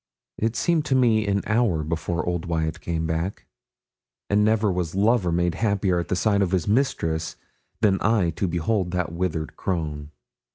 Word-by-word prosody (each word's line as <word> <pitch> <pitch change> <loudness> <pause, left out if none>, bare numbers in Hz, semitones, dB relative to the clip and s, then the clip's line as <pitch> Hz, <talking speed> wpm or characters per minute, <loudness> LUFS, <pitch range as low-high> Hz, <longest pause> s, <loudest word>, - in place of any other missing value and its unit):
It 110 +1 0
seemed 165 +4 +1
to 135 - +1
me 115 -4 +3
an 100 0 +1
hour 110 -8 +1
before 85 +1 -2
old 85 -1 -2
Wyat 80 -2 -2
came 80 -1 -2
back; 80 +4 -3 0.9
and 105 +1 +4
never 110 -1 +2
was 90 -2 -2
lover 100 -2 +2
made 85 0 +1
happier 100 -2 +1
at 90 +1 -2
sight 100 0 +2
of 95 - +2
his 90 -3 0
mistress 80 - 0 0.5
than 95 -3 +3
I 100 -5 +2
to 90 +4 -2
behold 90 +3 0
that 90 -3 -1
withered 85 -4 -3
crone. 75 -5 -3
90 Hz, 165 wpm, -24 LUFS, 85-105 Hz, 0.9 s, and